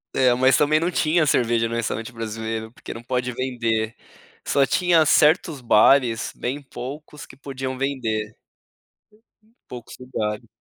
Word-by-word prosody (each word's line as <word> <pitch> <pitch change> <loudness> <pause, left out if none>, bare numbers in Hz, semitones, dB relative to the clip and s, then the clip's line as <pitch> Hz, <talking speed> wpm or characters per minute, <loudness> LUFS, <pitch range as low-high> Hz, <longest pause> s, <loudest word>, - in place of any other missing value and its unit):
É, 130 -2 +4
mas 130 +1 +4
também 150 +2 +3
não 170 +2 0
tinha 165 -2 +2
cerveja 120 -4 +2
no 115 - -4
restaurante 115 0 -3
brasileiro 110 0 -5
porque - - -9
não 115 - -10
pode 125 0 -2
vender. 115 -3 -2 0.5
Só 140 -1 +3
tinha 175 0 +3
certos 155 +1 +3
bares, 120 0 +3
bem 135 +4 -4
poucos, 145 +3 -9
que - - -15
podiam 135 -1 -6
vender. 115 -6 -2 1.4
Poucos 120 -2 -9
lugares. 115 -3 -4
125 Hz, 135 wpm, -22 LUFS, 115-140 Hz, 1.4 s, É